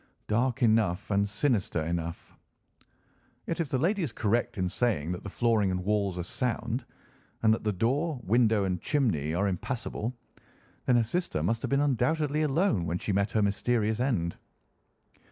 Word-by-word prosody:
"Dark 125 +4 +1
enough 105 -4 +2
and 100 0 +2
sinister 105 - 0
enough." 85 0 -4 1.1
"Yet 165 - -3
if 165 -4 -1
the 130 - +1
lady 185 +9 +1
is 155 -8 -1
correct 110 +1 0
in 90 -1 0
saying 90 -6 0
that 90 - -4
the 100 - -5
flooring 110 -2 +2
and 90 0 -2
walls 100 -3 0
are 90 - -2
sound, 120 +4 -2 0.6
and 110 -1 +6
that 110 - -2
the 105 - +2
door, 130 - 0
window, 110 -1 +3
and 90 -2 -1
chimney 85 - 0
are 100 +3 +1
impassable, 115 +4 -3 0.7
then 125 - +5
her 120 - +4
sister 120 - -1
must 115 +6 0
have - - -3
been 140 +1 +2
undoubtedly 145 +3 +1
alone 140 - +1
when 85 +2 -1
she 100 - -2
met 100 +2 +1
her 110 +1 +1
mysterious 110 +2 +1
end." 110 -10 0
110 Hz, 170 wpm, -29 LUFS, 95-125 Hz, 1.1 s, and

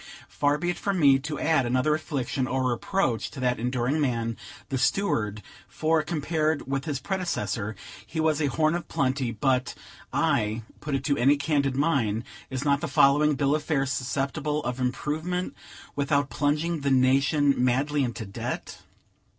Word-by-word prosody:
Far 145 0 +1
be 175 +3 -1
it - - -7
from 200 -2 -1
me 140 -3 +6
to 150 +1 -5
add 160 -4 +3
another 130 +5 +2
affliction 140 -4 -2
or 130 -1 0
reproach 120 - 0
to 140 - -9
that 125 -2 0
enduring 125 +5 0
man, 115 -4 0 0.3
the 135 - -1
steward; 110 - 0 0.2
for, 160 0 +1
compared 155 0 -1
with 135 +1 -2
his 145 -4 -2
predecessor, 130 - -2 0.3
he 160 - -6
was 155 -1 +2
a 145 - +2
horn 155 +3 +2
of 175 0 -3
plenty; 130 -2 0
but 125 +3 0 0.4
I 110 +2 +1 0.2
put 150 -2 -2
it 135 - -2
to 140 -2 +1
any 140 +4 +4
candid 140 -2 0
mind 130 -7 +1 0.3
is 130 +1 -4
not 140 0 +2
the - - -2
following 145 +2 +4
bill 140 +1 +1
of 155 - +1
fare 145 -3 0
susceptible 140 +3 -2
of 125 +1 -3
improvement, 155 +8 -2 0.4
without 140 -1 +1
plunging 150 +3 0
the 140 -1 -1
nation 135 +2 +4
madly 140 +3 +2
into 120 -3 -3
debt? 100 - -5
140 Hz, 165 wpm, -26 LUFS, 130-155 Hz, 0.4 s, me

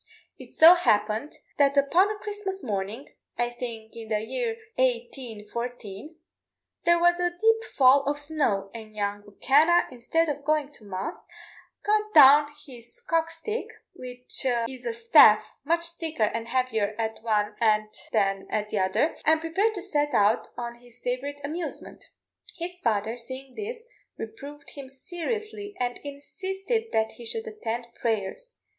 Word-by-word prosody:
It - - -13
so 330 +2 +10
happened 215 -6 +1 0.3
that 280 0 +4
upon 340 +8 +4
a 425 - -3
Christmas 410 -3 -5
morning, 210 +4 -4 0.3
I 240 0 0
think 230 -2 -7
in 225 -1 -9
the 215 -1 +1
year 455 - -3 0.2
1814, 240 0 -3 0.7
there 345 0 +5
was 345 +1 +3
a 355 0 +2
deep 450 +1 +3
fall 270 +1 +7
of 290 +1 0
snow, 285 -10 -1
and 220 -2 -10
young 205 0 -2
M'Kenna, 300 +11 +4
instead 255 +7 0
of 285 -1 -3
going 300 -1 +1
to 220 - -15
mass, 190 -1 -6 0.6
got 425 0 0
down 290 0 +9 0.2
his 250 - -11
cock 330 -7 0
stick 425 +8 -4 0.3
which 250 0 -4 0.2
is 255 -1 -8
a 235 - -1
staff 230 -3 +5
much 335 +3 +1
thicker 320 -7 -3
and 230 +2 -1
heavier 230 -5 0
at 220 -1 -2
one 210 -2 0
end 215 -1 +3 0.2
than 195 -3 +1
at 210 -1 -2
the 210 - 0
other 190 - +1
and 315 +1 +4
prepared 385 +8 0
to 375 - -4
set 295 -6 0
out 210 +2 +3
on 235 0 -5
his 245 0 -12
favourite 260 +4 -3
amusement. 320 +5 -5 0.5
His 355 +1 -5
father, 220 - 0
seeing 260 +2 -9
this, 460 +2 -6 0.3
reproved 290 -8 -9
him 275 -2 -9
seriously, 410 - -5
and 245 -1 -2
insisted 385 - -4
that 220 0 +1
he 240 - -10
should 450 - -4
attend 240 - -4
prayers. 230 - -3
270 Hz, 150 wpm, -26 LUFS, 225-340 Hz, 0.7 s, so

